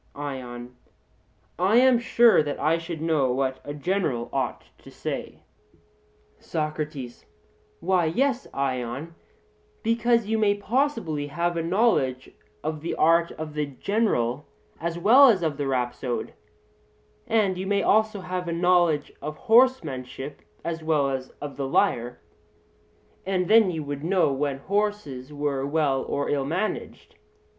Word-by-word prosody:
ION: 125 -4 -6 0.8
I 190 +5 +3
am 255 -1 +5
sure 235 -3 +5
that 145 -1 -4
I 160 +3 +2
should 165 -1 -6
know 150 -6 +2
what 130 +1 -1
a 145 - -6
general 150 -7 -1
ought - - -2 0.2
to - - -14
say. - - -6 1.0
SOCRATES: 150 -5 -4 0.6
Why, 180 -1 +2
yes, 255 - 0
Ion, 135 +3 -3 0.7
because 230 0 +2
you 220 +1 0
may 205 -2 +3
possibly 215 - -1
have 170 +4 -1
a 165 - 0
knowledge 165 - +1 0.3
of 155 0 -3
the 165 - -3
art 165 +2 +4
of 155 -1 -7
the 150 -1 -1
general 145 - -1 0.3
as 170 0 -3
well 240 +10 +7
as 190 -6 +2
of 155 -3 -1
the 145 -2 -2
rhapsode; 125 -1 -2 0.9
and 210 -4 +2
you 190 - -3
may 200 0 +1
also 215 -1 +2
have 180 -1 -4
a - - -2
knowledge 175 -3 +2
of 150 +1 -5
horsemanship 160 - +1 0.2
as 165 -1 -3
well 150 -3 +1
as 130 -1 -4
of 145 -1 -7
the 135 -1 -2
lyre: 120 -2 +1 1.0
and 185 -2 -1
then 220 -2 +6
you 160 -3 -3
would 145 0 -5
know 175 -4 +2
when 140 0 -1
horses 190 -7 -2
were 145 -2 -2
well 140 -2 +1
or 140 - -2
ill 140 -2 0
managed. 185 +8 -4
160 Hz, 140 wpm, -25 LUFS, 140-200 Hz, 1.0 s, well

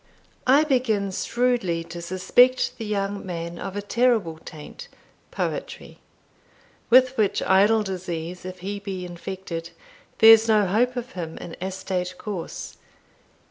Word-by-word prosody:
I 280 +4 +6
begin 235 -9 +1
shrewdly 235 -6 0
to 170 +1 -8
suspect 245 +11 +3
the 225 - -4
young 200 -1 -2
man 170 -2 -5
of 195 0 -6
a 205 - -3
terrible 220 -8 +1
taint 160 - -10 0.4
Poetry; - - -5 0.9
with 255 +2 +6
which 210 -3 +1
idle 210 +3 +4
disease 180 -2 -5
if 185 0 -8
he 200 +2 -4
be 190 -3 -5
infected, 175 -1 -6 0.5
there's 225 0 +8
no 215 -2 +4
hope 235 +7 +1
of 245 +1 -5
him 165 -6 -6
in 175 - -8
astate 185 -1 -3
course. 200 -6 -6
195 Hz, 130 wpm, -24 LUFS, 180-225 Hz, 0.9 s, there's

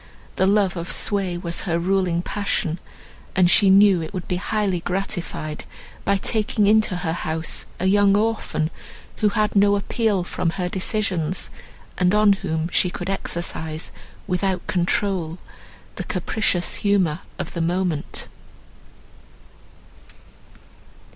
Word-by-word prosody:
The 190 - +2
love 200 -2 +3
of 170 +1 -4
sway 195 -4 0
was 170 -1 -3
her 165 - +2
ruling 180 -1 +1
passion, 195 -5 -1 0.6
and 180 -1 +4
she 200 +1 +6
knew 195 -2 +6
it 160 +5 -6
would 180 - -5
be 180 - -1
highly 200 -1 0
gratified 175 -4 -3 0.4
by 200 0 +3
taking 210 +1 +1
into 215 -2 +4
her 175 -2 -2
house 160 -1 -2
a 185 - -1
young 200 +1 +4
orphan, 215 -7 0 0.5
who 210 - +3
had 210 0 0
no 200 0 +5
appeal 205 -1 0
from 175 -1 -1
her 180 -2 -1
decisions, 185 -3 -1 0.5
and 180 +2 +3
on 210 -1 +6
whom 165 -5 -2
she 180 - +2
could 175 +1 -4
exercise 160 -4 -3 0.3
without 185 -1 -1
control 180 -2 0 0.6
the - - -3
capricious 180 -5 0
humour 190 -6 +2 0.2
of - - -5
the 170 - -2
moment. 175 -2 -1
185 Hz, 130 wpm, -22 LUFS, 175-200 Hz, 0.6 s, she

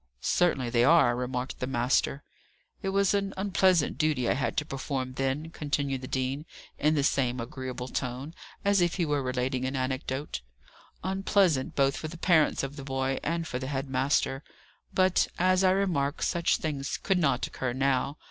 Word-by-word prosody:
"Certainly 135 - +1
they 120 -1 +3
are," 145 -4 +5
remarked 125 +1 -3
the 125 - -2
master. 130 +2 +1 0.6
"It 195 - -2
was 195 0 +2
an 200 -1 -1
unpleasant 190 -4 +2
duty 150 -6 +1
I - - +3
had 140 - -2
to 150 - +1
perform 135 -2 -3
then," 135 +5 -2
continued 145 -4 -2
the 130 - -6
dean, 135 +4 -2 0.3
in 150 +1 +3
the 145 - +2
same 125 -3 +1
agreeable 125 +1 -5
tone, 130 +4 -4 0.3
as 200 -2 +4
if 175 -1 +2
he 175 - +1
were 145 -2 0
relating 130 0 -1
an 130 +1 -2
anecdote: 130 - -3 0.6
"unpleasant 190 -6 +1
both 135 -1 +3
for 155 - -4
the 170 +2 -8
parents 160 -5 +3
of 135 +2 -5
the 140 - -6
boy, 135 0 -1
and 165 +1 -2
for 125 - -3
the 130 - -5
head 135 0 -3
master. 135 +1 +1 0.5
But, 185 -1 +3
as 185 +1 +3
I 185 - +5
remark, 175 -7 0
such 170 -1 +2
things 140 -3 -3
could 190 -2 +1
not 135 -6 +2
occur 130 -2 -3
now. 135 +2 0
140 Hz, 175 wpm, -28 LUFS, 130-170 Hz, 0.6 s, are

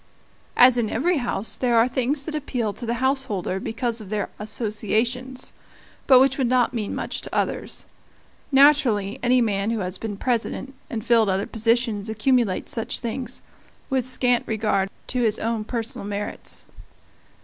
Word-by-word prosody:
As 245 0 +7
in 220 -3 0
every 335 +10 +1
house, 240 -4 0
there 240 -2 +2
are 230 +2 +5
things 260 +3 +1
that 320 - -4
appeal 250 -8 -2
to 240 - -6
the 235 - 0
householder 255 -9 -1
because 230 +2 -3
of 200 - -10
their 210 -1 -2
associations, 225 +4 -2 0.5
but 260 -2 +8
which 270 +1 +3
would 260 - +2
not 250 -1 +2
mean 215 -4 -3
much - - -4
to - - -7
others. - - -2 0.7
Naturally, 265 -8 +4
any 250 0 +3
man 205 -2 0
who 230 -2 -1
has 185 0 -4
been 210 -3 -5
President, 250 +3 -2 0.2
and 225 -1 -4
filled 230 -4 +4
other 190 +1 0
positions, 225 -2 0
accumulates 220 -2 +1
such 225 - -2
things, 245 +1 -5 0.5
with 260 -2 +1
scant 245 -1 +2
regard 210 -3 0 0.2
to 250 - -1
his 220 -3 +2
own 225 -1 -2
personal 230 -2 -5
merits. 205 0 -6
235 Hz, 160 wpm, -23 LUFS, 215-255 Hz, 0.7 s, but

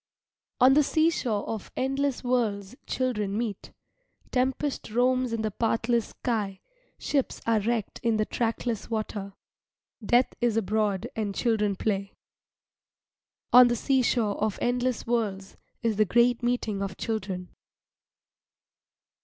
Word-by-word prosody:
On 260 +1 +7
the 300 - +6
seashore 290 -8 +1
of 220 -3 -5
endless 270 0 0
worlds 225 -4 -1
children 210 -6 -1
meet. 220 -4 -4 0.6
Tempest 265 +2 -1
roams 250 +2 +2
in 225 -1 -2
the 215 - -1
pathless 230 +2 0
sky, 210 -6 -3 0.4
ships 275 -3 -1
are 230 -1 +3
wrecked 225 0 -2
in 230 -2 +1
the 215 - +1
trackless 230 -1 -2
water, 210 -3 -3 0.7
death 240 +4 +3
is 235 -2 +2
abroad 210 -2 0
and 205 -3 -2
children 210 -4 +1
play. 195 -1 -2 1.4
On 250 0 +10
the 240 - +1
seashore 240 -5 +1
of 215 -2 0
endless 245 0 0
worlds 205 -5 -2 0.3
is 225 -3 +1
the 215 - +4
great 240 +4 +3
meeting 240 -4 -1
of 195 -2 -4
children. 190 -5 -3
230 Hz, 120 wpm, -27 LUFS, 210-245 Hz, 1.4 s, On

